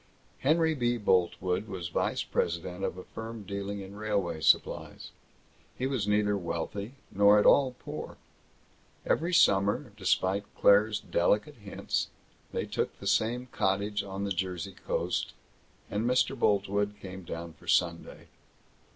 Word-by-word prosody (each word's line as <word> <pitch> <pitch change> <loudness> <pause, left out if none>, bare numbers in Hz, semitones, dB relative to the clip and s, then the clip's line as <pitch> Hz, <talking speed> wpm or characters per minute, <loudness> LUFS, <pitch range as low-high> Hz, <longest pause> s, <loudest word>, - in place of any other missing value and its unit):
Henry 160 +3 +3
B. 120 -4 0
Boltwood 95 -1 +1
was 90 -5 -5
vice - - 0
president 85 +2 -2
of 95 - -2
a 90 - -7
firm 115 -1 -8
dealing 100 +1 -4
in 95 0 -9
railway 100 -6 -1
supplies. - - +1 0.7
He 130 - -1
was 130 -7 -1
neither 105 0 +2
wealthy 100 +6 -4 0.2
nor 100 +1 +6
at 105 - +3
all 130 -3 +5
poor. - - -7 0.9
Every 170 +3 +1
summer, 105 - +3
despite 95 0 +1
Claire's 105 +1 +5
delicate 105 - +1
hints, 105 -3 -3 0.4
they - - -2
took - - -2
the - - -11
same 120 +3 +1
cottage 100 +2 0
on 95 0 -5
the 100 - -2
Jersey 95 +1 -3
Coast, - - -1 0.5
and 105 +2 -2
Mr. 125 +1 +2
Boltwood 100 -2 +1
came 95 -1 -8
down 85 -1 -7
for - - -19
Sunday. 85 -2 0
100 Hz, 135 wpm, -29 LUFS, 95-110 Hz, 0.9 s, nor